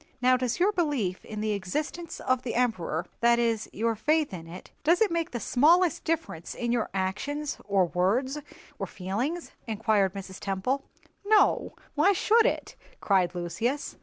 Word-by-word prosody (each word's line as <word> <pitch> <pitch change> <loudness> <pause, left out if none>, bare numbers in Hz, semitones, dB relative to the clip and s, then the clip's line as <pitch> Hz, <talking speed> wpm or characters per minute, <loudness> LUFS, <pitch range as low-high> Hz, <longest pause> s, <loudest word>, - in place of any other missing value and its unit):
"Now 255 0 +4
does 250 +1 -1
your 385 +4 +4
belief 290 - -1
in 215 -1 -6
the 215 0 0
existence 300 - -3
of 255 -1 +1
the 250 - -4
Emperor—that 235 0 +1
is, 230 -2 0
your 230 +2 0
faith 305 +3 +1
in 165 -2 -7
it—does 300 - -1
it 435 -4 +3
make 335 0 0
the 240 - -4
smallest 320 +8 +3
difference 320 - -3
in 240 -1 -2
your 240 -2 0
actions, 240 +11 -2
or 195 -3 +3
words, 225 - 0 0.4
or - - -2
feelings?" 240 - -3 0.2
inquired 210 -3 +1
Mrs. 190 -1 -7
Temple. 210 +9 -1 0.4
"No, 420 +1 +3 0.2
why 360 +7 +4
should 440 +4 +4
it?" - - -3 0.2
cried 185 -3 +2
Lucius. 220 - -2
235 Hz, 155 wpm, -28 LUFS, 195-300 Hz, 0.4 s, Now